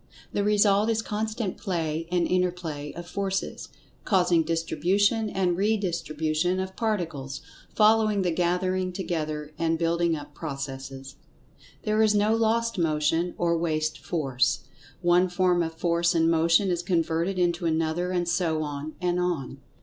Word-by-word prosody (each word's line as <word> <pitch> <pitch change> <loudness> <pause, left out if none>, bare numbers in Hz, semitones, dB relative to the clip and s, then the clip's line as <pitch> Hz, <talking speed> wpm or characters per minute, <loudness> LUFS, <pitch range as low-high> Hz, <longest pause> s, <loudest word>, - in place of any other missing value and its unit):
The 200 - 0
result 205 0 +3
is 220 -1 0
constant 215 -1 -3
play 165 -3 -2
and 175 -1 +2
inter 180 +1 +2
play 155 -5 -6
of 175 +1 -8
forces, 195 +1 -3 0.3
causing 180 -4 +3
distribution, 195 +7 +1
and 185 -3 0
redistribution 175 -4 0
of 190 0 -4
Particles, 170 - -2 0.3
following 215 -2 +4
the 180 - +1
gathering 185 +2 0
together 155 -5 -3
and 165 0 +1
building 170 0 +1
up 145 -1 -9
processes. 135 -3 -6 0.7
There 215 +1 +1
is 215 -1 +4
no 210 +2 +3
lost 230 -1 +1
motion, 165 +2 +1
or 170 -1 +1
waste 155 -2 -1
force. 135 -7 0 0.4
One 175 +1 +4
form 180 -1 +2
of 165 -1 -3
force 170 0 +1
and 165 0 +3
motion 165 +4 +3
is 175 -1 0
converted 170 +1 0
into 175 -1 +1
another, 165 +2 0
and 175 -1 -1
so 165 -3 0
on, 150 +1 -5
and 180 0 0
on. 160 -7 -2
175 Hz, 140 wpm, -26 LUFS, 160-190 Hz, 0.7 s, following